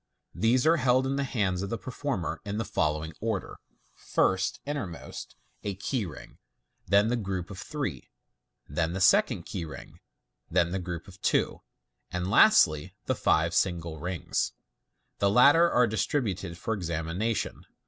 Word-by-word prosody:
These 125 +4 +2
are 165 +2 +5
held 130 -2 +3
in 135 +1 0
the 140 - 0
hands 100 -9 -1
of 100 - -3
the 115 - -2
performer 130 - -3
in 100 0 -4
the 115 - -1
following 75 -1 -1
order. 110 -4 -3 0.3
First 95 0 0
(i.e., 145 - -2
innermost) 100 - -6 0.3
a 100 -2 -3
key 105 +2 -2
ring, 75 -6 -11 0.5
then 100 +4 +4
the 120 - +1
group 95 -5 -3
of 95 - -8
three, - - -4 0.6
then 80 +4 -1
the 95 - -3
second 95 - +4
key - - -5
ring, 80 - -10 0.5
then 85 0 +2
the 95 - -1
group 90 -2 -6
of - - -14
two, - - +1 0.5
and 90 +1 -3
lastly 80 - +5
the - - +1
five 80 +2 +2
single 85 -4 0
rings. 90 +2 -2 0.7
The 100 - +3
latter 145 +10 +6
are 125 -5 +4
distributed 100 - -1
for 110 +6 -2
exami 85 -3 -3
nation. 110 +3 -2
100 Hz, 160 wpm, -28 LUFS, 85-120 Hz, 0.7 s, latter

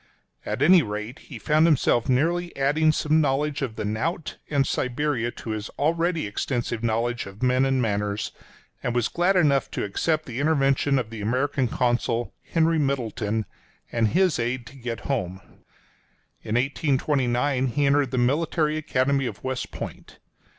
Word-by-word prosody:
At 110 +6 -1
any 175 +3 +7
rate 105 +4 -5
he - - -10
found 155 +1 +3
himself 130 -6 +2
nearly 170 +7 +1
adding 150 +3 +3
some 155 +1 +2
knowledge 145 +1 0
of 125 -5 -3
the - - -4
knout 155 - -2
and 140 -2 +2
Siberia 125 -1 -1
to 110 - -6
his 105 -1 -4
already 165 +2 +1
extensive 120 +2 -2
knowledge 115 0 -1
of 100 +4 -10
men 130 +1 +3
and 135 -1 +1
manners, 105 -1 -1 0.5
and 120 -1 -2
was 120 -2 +2
glad 180 +3 +1
enough 140 -7 +3
to - - -3
accept 155 +10 0
the 120 0 -5
intervention 140 -2 +2
of 115 -4 -2
the 110 -2 -6
American 130 +4 0
consul, 120 0 0 0.2
Henry 165 -1 +2
Middleton, 110 -6 -1 0.5
and 115 -1 +2
his 180 - +2
aid 120 +1 -2
to 140 - -13
get 120 -3 -5
home. 95 -9 -2 1.0
In 110 - -3
1829 135 -1 +1
he 145 +4 0
entered 140 -1 +3
the 130 - -3
Military 150 +4 +1
Academy 140 -3 +1
of - - -8
West 130 -1 -3
Point. - - -8
130 Hz, 155 wpm, -25 LUFS, 120-150 Hz, 1.0 s, any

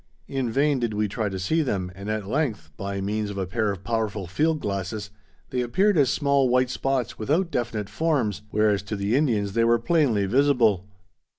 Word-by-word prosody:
In 135 -3 -2
vain 140 +3 +2
did 115 -3 -1
we 105 0 +1
try 105 +1 -2
to 95 - -4
see 125 - +1
them, 95 -10 -2
and 100 +2 -7
at 110 -2 -2
length, 115 - -2
by 100 +2 -4
means 105 +1 -2
of 100 - -6
a 95 - -1
pair 105 +3 0
of 100 -1 -7
powerful 110 -4 -2
field 155 - 0
glasses, 100 0 -4 0.4
they 125 - 0
appeared 190 - +2
as 140 -5 +4
small 140 -3 +2
white 125 0 +2
spots 130 -3 -1
without 160 - 0
definite 115 -6 -2
forms, 110 - 0
whereas 105 -1 +2
to 100 +2 -5
the 100 +3 0
Indians 110 -9 +1
they 115 - +2
were 115 0 +4
plainly 120 -5 +2
visible. 115 -5 +3
110 Hz, 195 wpm, -25 LUFS, 100-135 Hz, 0.4 s, as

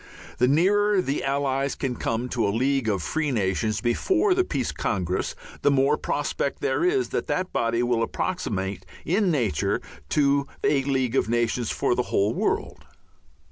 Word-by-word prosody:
The 125 - +4
nearer 200 +8 +3
the 145 -6 -1
Allies 135 0 0
can 130 -3 -2
come 115 +2 -2
to 120 -4 0
a - - +1
League 130 +2 +1
of 100 -5 -1
Free 155 - -1
Nations 105 -2 0
before 365 - +2
the 370 0 +2
Peace 135 - -2
Congress 90 -3 -2 0.3
the - - +4
more 140 +1 +3
prospect - - -2
there - - 0
is 375 +1 +2
that - - -2
that 185 0 -2
body 115 +1 +1
will 120 -1 +1
approximate 100 - -2 0.2
in 190 +4 +2
nature 120 - 0 0.3
to 140 -1 +2 0.2
a 140 -2 +3
League 130 -3 0
of 125 - +1
Nations 120 0 0
for - - +1
the 125 - +1
whole 100 +3 +2
world. - - -2
130 Hz, 165 wpm, -25 LUFS, 115-150 Hz, 0.3 s, The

